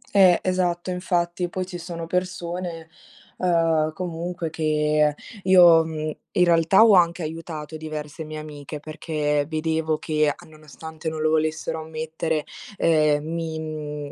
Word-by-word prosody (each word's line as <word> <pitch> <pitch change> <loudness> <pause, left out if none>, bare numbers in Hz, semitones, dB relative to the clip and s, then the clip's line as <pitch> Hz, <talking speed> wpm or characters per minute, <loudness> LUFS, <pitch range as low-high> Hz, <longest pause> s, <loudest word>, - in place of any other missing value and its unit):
Eh, 185 -3 +7
esatto, 180 -1 0
infatti, 175 -1 -1
poi 185 +1 -3
ci 180 -1 -7
sono 170 -1 -6
persone, 175 -1 -3 0.5
uhm, 165 -3 +2
comunque 170 -1 -4
che 150 -1 +1 0.3
io, 175 -3 +7
mhmm, 155 -1 -4 0.2
in 180 - +4
realtà, 170 +4 +5
ho 220 - +6
anche 170 -1 +4
aiutato 160 -1 -6
diverse 155 0 -6
mie 155 0 -7
amiche, 150 -1 -8
perché 150 -1 -2
vedevo 160 0 0
che, 155 -2 +1 0.2
nonostante 155 +1 -8
non 160 0 -5
lo 155 0 +2
volessero 155 0 0
ammettere, 160 0 -3 0.3
ehm, 155 -2 +3
mi, 165 0 -3
mhmm, 150 -2 -5
160 Hz, 130 wpm, -24 LUFS, 155-175 Hz, 0.5 s, Eh